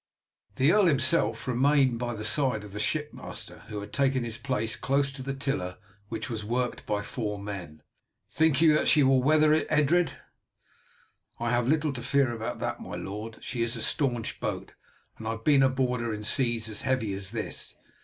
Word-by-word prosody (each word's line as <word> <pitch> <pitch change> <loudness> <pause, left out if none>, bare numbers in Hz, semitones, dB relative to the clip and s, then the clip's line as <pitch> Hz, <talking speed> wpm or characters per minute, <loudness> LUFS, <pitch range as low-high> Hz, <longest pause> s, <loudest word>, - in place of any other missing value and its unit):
The 135 +5 +4
earl 205 -1 +5
himself 130 -6 +2
remained 130 -1 +3
by 120 -1 -2
the 110 0 -4
side 115 -1 +2
of 105 -2 -11
the 105 - -5
ship 150 +7 0
master, - - -6
who 105 -2 -5
had 100 - -10
taken 135 -2 +2
his 115 -1 -4
place 120 -5 -1
close 140 +1 +1
to 135 -1 -9
the 135 +1 -4
tiller, 115 -10 -2 0.3
which 110 -1 -4
was 110 -4 -4
worked 120 +3 -2
by 105 -1 -1
four 105 -4 -3
men. 95 -7 -7 0.4
"Think 155 -2 +2
you 160 -2 +6
that 150 - +2
she 150 -3 +5
will 135 -1 +4
weather 155 +2 +4
it, 155 - +1
Edred?" 150 +1 +3 1.3
"I 120 0 -1
have 120 0 +1
little 150 0 +2
fear 130 +1 +1
about 115 -1 -4
that, - - -2
my - - -7
lord. 105 +3 -6
She 120 - -4
is 115 0 0
a - - -3
staunch 125 -7 0
boat, - - -4 0.5
and 110 - -6
I 110 - 0
have 115 0 -9
been 145 -3 +5
aboard 130 -2 +1
her 120 -1 -2
in 105 0 -5
seas 120 -1 +1
as 105 -1 -3
heavy 125 -6 0
as 95 0 -4
this. 110 0 -4
125 Hz, 195 wpm, -28 LUFS, 110-140 Hz, 1.3 s, you